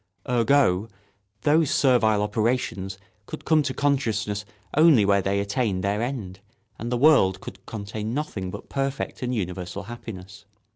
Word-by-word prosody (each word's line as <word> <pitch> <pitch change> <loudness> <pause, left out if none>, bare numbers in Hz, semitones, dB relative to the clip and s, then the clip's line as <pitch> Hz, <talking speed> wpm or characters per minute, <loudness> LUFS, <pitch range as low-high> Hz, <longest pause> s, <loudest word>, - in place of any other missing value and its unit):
Ergo, 120 -4 +2 0.5
those 155 0 +3
servile 110 -6 +3
operations 105 -3 -1 0.3
could - - -8
come 160 -1 +4
to 140 -2 -2
consciousness 115 -7 -1 0.3
only 150 -8 +6
where 100 0 +3
they 100 +1 0
attained 100 -2 -1
their 100 +2 0
end, 115 -7 -4 0.4
and 115 +2 -4
the 125 - +1
world 120 -10 +5
could 95 +1 -10
contain 110 0 -5
nothing 120 -9 -3
but - - -8
perfect 135 0 -3
and 125 0 -1
universal 90 -1 -4
happiness. 100 -4 -9
110 Hz, 140 wpm, -25 LUFS, 100-130 Hz, 0.5 s, only